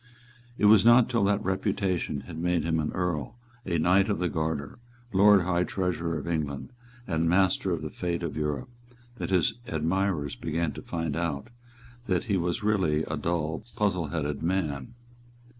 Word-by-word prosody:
It - - +1
was 105 -1 +7
not 120 +1 +6
till 115 -4 +2
that 100 +1 +1
reputation 95 -5 -1
had 85 -3 -8
made 90 0 +1
him 80 -1 0
an 75 - -1
Earl, 90 +2 -2 0.3
a 85 -2 +1
Knight 95 +5 +3
of 105 - +1
the 90 -1 0
Garter, 80 +2 -3 0.3
Lord 100 +1 +6
High 90 0 +1
Treasurer 85 -3 -2
of 75 - -6
England, 80 - -3 0.3
and 80 -1 0
master 95 +1 +2
of 80 -3 -2
the 75 - -5
fate 85 -1 -3
of 80 -4 -3
Europe, 75 - -2 0.5
that - - -3
his 90 -4 +3
admirers 80 -1 0
began 80 0 -2
to - - -8
find 80 -3 -3
out 85 +3 -2 0.6
that 90 -4 +1
he 100 - 0
was 85 +3 -1
really 95 -8 +2
a 75 - -3
dull 80 +1 -2
puzzleheaded 85 -9 -1
man. 80 - -2
85 Hz, 165 wpm, -27 LUFS, 80-95 Hz, 0.6 s, was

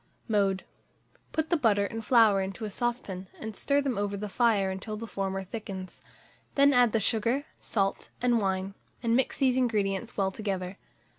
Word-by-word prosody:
Mode. 200 -4 +1 0.7
Put 315 +1 -1
the 340 - +4
butter 210 -7 +3
and 225 +2 -5
flour 220 -4 +5
into 195 +3 -4
a 210 - -5
saucepan, 205 -6 -3
and 220 -1 -6
stir 280 +6 +2
them 265 -7 -1
over 205 0 -1
the 210 +1 -4
fire 205 -3 +2
until 210 +3 -5
the 230 - -5
former 195 -2 -3
thickens; 190 -2 -7 0.5
then 280 0 +6
add 245 -3 +5
the 225 - +2
sugar, 230 +6 +1
salt, 195 -3 -1
and 240 -2 +2
wine, 190 0 -1 0.3
and 230 0 +2
mix 260 0 +2
these 260 -2 +3
ingredients 215 -3 0
well 195 -1 +1
together. 190 -2 -4
215 Hz, 170 wpm, -29 LUFS, 195-240 Hz, 0.7 s, then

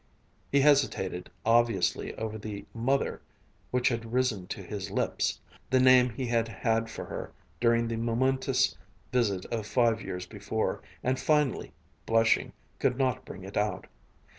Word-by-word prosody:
He 140 - +4
hesitated 135 -11 +2 0.2
obviously 115 -4 +2
over 110 -1 -4
the 105 -1 -6
"Mother" 130 +4 0 0.5
which 125 0 +2
had 115 -2 -3
risen 120 -7 0
to 100 - -6
his 100 0 -5
lips, - - -1 0.3
the 130 - +4
name 130 -1 +6
he 125 +3 -4
had 115 -1 +1
had 115 +1 0
for - - -6
her - - -6 0.3
during 115 -1 +3
the 115 0 -2
momentous 125 +4 +1 0.4
visit 105 -7 +1
of 110 -3 -2
five 115 -3 +2
years 90 -3 -5
before, 110 +1 -2 0.2
and 130 +1 +1
finally, 150 -4 +1 0.4
blushing, 115 0 +3 0.3
could 125 - +1
not 130 -3 0
bring 95 - -9
it 95 +1 -9
out. 105 -2 0
115 Hz, 145 wpm, -29 LUFS, 105-125 Hz, 0.5 s, name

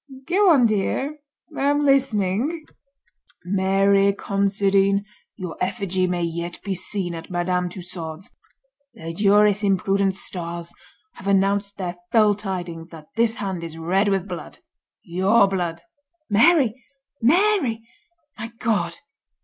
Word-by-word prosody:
"Go 385 +3 +3
on, 275 -8 +5
dear; 230 +8 -1 0.4
I - - -4
am 290 +1 +2
listening." 270 - +1 0.8
"Mary 195 +1 +3
Considine, 200 0 +1 0.3
your 180 -5 -6
effigy 185 -2 -1
may 175 -1 -1
yet 170 +1 -4
be 200 - -2
seen 185 -1 -1
at 165 0 -8
Madame 180 0 -1
Tussaud's. 175 -2 -6 0.6
The 165 +1 -7
juris 205 +1 +4
imprudent 195 0 +1
Stars 170 -2 -4 0.4
have 190 - -9
announced 200 +1 +1
their 180 -2 -4
fell 215 -3 +5
tidings 180 -5 -6
that 155 -2 -13
this 230 0 +2
hand 190 -5 -4
is 165 -1 -7
red 185 +5 +1
with 195 -1 0
blood—your 195 +4 -1
blood. 175 -4 -3 0.5
Mary! 255 0 +4 0.4
Mary! 275 - +2 0.5
my 220 - -4
God!" 205 -8 0
195 Hz, 115 wpm, -22 LUFS, 180-220 Hz, 0.8 s, on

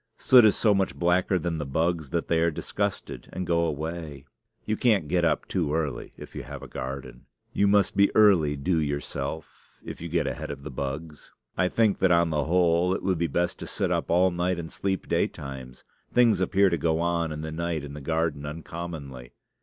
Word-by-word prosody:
Soot 125 -2 +6
is 105 - +5
so 105 -3 +3
much 95 -1 0
blacker 90 +2 +2
than 85 -2 -2
the - - -2
bugs 80 +1 -1
that 85 +3 -2
they 85 - +2
are 85 +1 +3
disgusted 100 +5 -4
and 90 - -4
go 85 -1 +2
away. 80 -2 -5 0.4
You 110 - 0
can't 105 -9 +2
get 90 +2 +1
up 80 -3 +1
too 80 -5 -1
early 75 -6 -3
if - - -11
you - - -4
have - - -9
a - - -8
garden. 65 +1 -7 0.3
You 100 - +3
must 100 -1 +3
be 100 0 +5
early 90 -9 +5
due 80 +5 0
yourself, 75 +1 -5
if - - -8
you 85 - -5
get 85 +1 0
ahead - - -4
of 70 -1 -7
the 75 - -7
bugs. 70 +4 -6 0.2
I 90 - +2
think 110 +1 +2
that, 95 - +3
on 85 -1 +3
the 75 -2 0
whole, 90 +1 +2
it - - -5
would 95 -3 0
be 85 - +1
best 85 +2 -1
to - - -7
sit - - -2
up - - -1
all 90 +2 +4
night 90 +1 -1
and 80 -1 -6
sleep 95 -2 -2
daytimes. 65 -3 -3 0.3
Things 115 -6 +4
appear 95 +1 +3
to 85 - 0
go 80 -1 +1
on 85 -1 0
in 75 0 -5
the 80 0 -5
night 85 -1 -2
in 70 -1 -8
the 75 - -8
garden 80 -1 -1
uncommonly. 75 -5 -7
85 Hz, 210 wpm, -26 LUFS, 75-90 Hz, 0.4 s, Soot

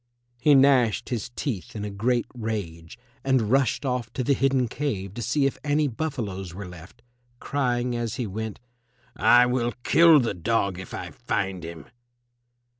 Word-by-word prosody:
He 145 +3 +5
gnashed 130 -5 +4
his 120 -3 -3
teeth 115 - -4
in 105 -1 -4
a 105 - -5
great 120 +4 0
rage, 100 -9 -5 0.3
and 130 -5 +1
rushed 135 +1 +2
off 125 -3 -2
to 130 - -2
the 140 - +3
hidden 135 -2 +2
cave 105 -8 -3
to 120 - -6
see 135 +5 +1
if 135 - -1
any 150 0 +2
buffaloes 110 - -4
were 100 +1 -6
left, 90 +2 -13 0.4
crying 125 -3 -1
as 120 -2 -2
he 125 - -2
went, 110 +1 -5 0.6
"I 120 0 +6
will 125 -1 0
kill 165 -2 +6
the 120 -5 0
dog 100 0 0
if 95 - -9
I - - -6
find 95 -2 -3
him." 85 -2 -8
120 Hz, 165 wpm, -25 LUFS, 100-135 Hz, 0.6 s, I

